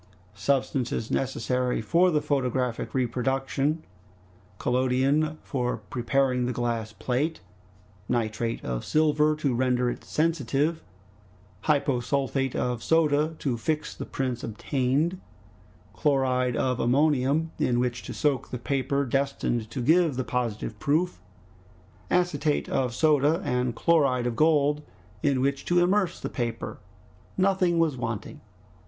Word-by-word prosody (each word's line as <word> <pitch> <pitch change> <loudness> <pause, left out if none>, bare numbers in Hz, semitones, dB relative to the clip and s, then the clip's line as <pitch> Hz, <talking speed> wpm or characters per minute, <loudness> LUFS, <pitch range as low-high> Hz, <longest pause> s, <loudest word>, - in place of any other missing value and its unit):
Substances 125 +1 -1
necessary 125 -1 0
for 170 +12 +3
the 150 -4 +1
photographic 130 -5 -1
reproduction, 135 +4 0 0.7
collodion 130 +5 +1
for 125 -3 -2
preparing 125 0 0
the - - 0
glass 115 -2 -2
plate, 135 +8 -2 0.7
nitrate 115 -1 -1
of - - -3
silver 155 0 +2
to 145 -4 0
render 125 0 +1
it - - -8
sensitive, 155 0 0 0.8
hyposulfate 135 -2 0
of 125 -2 -1
soda 155 0 +2
to 130 -5 -1
fix 155 +6 -2
the - - -6
prints 130 -3 -3
obtained, 140 - -1 0.7
chloride 130 -3 +1
of 125 -2 0
ammonium 145 +4 +2
in 120 -1 +2
which 125 -1 -1
to - - -8
soak 145 -3 0
the 125 - -4
paper 140 +2 -1
destined 130 -4 -1
to 125 - -4
give 160 +1 +4
the 130 - -1
positive 120 -4 -3
proof, 160 +5 0 0.9
acetate 160 -4 +1
of 125 -3 -1
soda 155 +1 +3
and 125 -1 0
chloride 140 -6 +2
of 120 -1 -1
gold 150 +1 +3 0.4
in 135 -3 +2
which 140 +1 0
to 175 - +1
immerse 185 0 +2
the - - -4
paper, 115 -2 -4 0.6
nothing 185 -2 +2
was 165 -4 +2
wanting. 115 -4 -5
135 Hz, 120 wpm, -26 LUFS, 125-150 Hz, 0.9 s, give